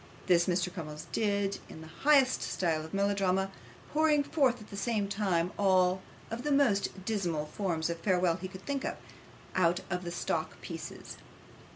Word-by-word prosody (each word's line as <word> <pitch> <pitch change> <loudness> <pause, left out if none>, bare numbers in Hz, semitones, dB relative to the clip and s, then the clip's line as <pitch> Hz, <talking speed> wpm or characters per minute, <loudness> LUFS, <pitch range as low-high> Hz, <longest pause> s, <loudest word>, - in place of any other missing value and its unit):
This 170 0 +4
Mr. 180 0 0
Crummles 150 -4 -6
did 200 -2 0
in 160 - -10
the 160 - -9
highest 275 -3 +5
style 160 -4 0
of 160 - -9
melodrama, 195 -1 +1 0.4
pouring 300 -1 +4
forth 270 -5 +2
at 215 - -13
the - - -6
same 210 -1 0
time 190 -4 0
all 185 -1 +4 0.3
the 245 +6 -2
most 205 -9 +2
dismal 175 -9 -1
forms 165 -1 -1
of 170 0 -3
farewell 180 -2 +2
he 185 - -5
could 190 0 -11
think 280 -1 -2
of, - - -3 0.6
out 175 0 +2
of 180 +1 -1
the 175 - -4
stock 170 - -2
pieces. - - -7
190 Hz, 165 wpm, -31 LUFS, 175-215 Hz, 0.6 s, highest